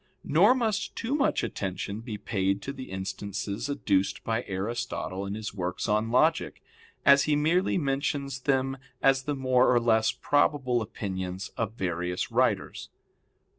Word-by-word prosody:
Nor 200 - +5
must 220 -5 -1
too 230 +4 -2
much 290 -1 +1
attention 100 +2 -3
be 115 -3 -6
paid 100 -1 -1
to 140 - -4
the 130 -2 -8
instances 100 +4 -4
adduced 100 -9 0
by 115 +1 -1
Aristotle 100 -1 -3
in 100 - -3
his 110 -2 -5
works 90 -2 -3
on 105 +2 +1
logic, 155 +7 +2 0.4
as 140 0 +7
he 150 - +2
merely 165 +7 +2
mentions 140 -2 -1
them 135 0 0 0.3
as 135 -1 +4
the 145 - -1
more 130 -1 +3
or 120 - +5
less 110 -1 +3
probable 135 -4 +1
opinions 95 -3 -4
of 110 -1 -3
various 90 -3 -2
writers. - - 0
120 Hz, 145 wpm, -28 LUFS, 100-140 Hz, 0.4 s, as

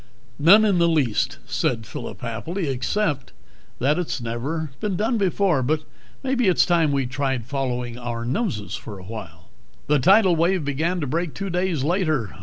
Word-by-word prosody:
"None 200 +9 +7
in 195 -4 +3
the 170 - +4
least," 140 -10 +1
said 115 -3 -1
Phillip 100 -1 -7
happily, 155 - -3
"except 140 +3 -1 0.4
that 145 +7 +2
it's 140 -7 -2
never 130 +7 -3
been 210 -3 -1
done 220 +5 0
before. 190 -5 +2
But 155 +4 0 0.4
maybe 260 -4 +1
it's 185 - +4
time 170 -4 +3
we 135 -2 +1
tried 135 -2 -2
following 125 -3 -3
our 120 -1 -4
noses 130 - -2
for 105 -3 -6
a 95 - -11
while." 85 -6 -9 0.4
The 150 0 +3
tidal 190 - +5
wave 170 0 +1
began 160 +6 -1
to - - -1
break 165 +4 -2
two 195 -1 -4
days 175 -5 0
later 155 - 0
150 Hz, 170 wpm, -23 LUFS, 125-180 Hz, 0.4 s, None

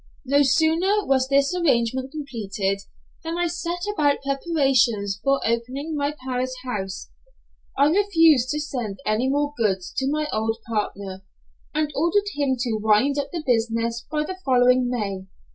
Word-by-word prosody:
No 280 +2 +3
sooner 325 +9 +2
was 265 -1 +2
this 275 +3 +2
arrangement 260 -6 +1
completed 205 -9 -3 0.4
than 330 +1 -3
I 350 - +1
set 345 +1 -3
about 290 -7 +1
preparations 265 - +1
for 275 +1 +2
opening 255 +7 -2
my 290 0 -1
Paris 255 0 -2
house. 195 -6 -5 0.7
I 280 - +5
refused 325 - +4
to 300 - -1
send 245 -9 -4
any 220 +5 +1
more 290 +1 0
goods 195 -6 -1
to 265 0 +1
my 305 +1 0
old 220 +1 0
partner, 200 -3 -3 0.5
and 305 -1 0
ordered 405 +7 +1
him 280 -3 0
to 230 -4 -1
wind 220 +7 +3
up 280 - -3
the 335 -3 -4
business 230 -1 0
by 300 -1 0
the 370 +4 -6
following 250 -1 +4
May. 200 -6 -3
265 Hz, 150 wpm, -23 LUFS, 230-300 Hz, 0.7 s, I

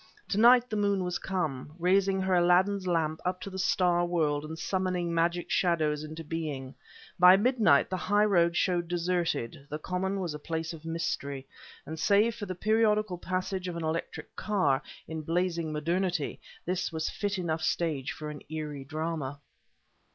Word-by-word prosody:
To 205 - 0
night 245 +2 +7
the 220 - -4
moon 200 -2 +1
was 180 0 -2
come, 155 -6 -3
raising 190 +2 +2
her 190 0 +1
Aladdin's 185 +2 +3
lamp 160 -3 0
up 180 0 -1
to 195 - -6
the 190 - -5
star 180 -1 +2
world 155 -4 0
and 160 +1 -6
summoning 180 -1 -1
magic 170 +1 0
shadows 155 -4 +1
into 155 +1 -7
being. 150 -5 -4 0.5
By 180 +1 +9
midnight 210 - +3
the 185 - 0
highroad 185 -3 +3
showed 175 -2 +1
deserted, 170 -7 -1
the 150 - -3
common 190 +4 -2
was 175 -5 -3
a 150 - -6
place 160 +1 -3
of 160 -1 -11
mystery; 140 -5 -3 0.4
and 160 +2 -6
save 210 +5 +4
for 210 -3 -6
the 185 - -4
periodical 215 -2 +2
passage 185 +1 -2
of 175 - -4
an 165 - -4
electric 160 +1 -4
car, 185 -11 +1 0.3
in 160 0 -4
blazing 170 0 -1
modernity, 170 +1 -1 0.3
this 180 +1 -1
was 160 -1 -2
a - - -2
fit 205 -1 -2
enough 165 -3 -2
stage 155 -5 -1
for 150 -1 -6
an 150 - -9
eerie 150 -3 -5
drama. 155 -1 -4
175 Hz, 170 wpm, -29 LUFS, 155-190 Hz, 0.5 s, By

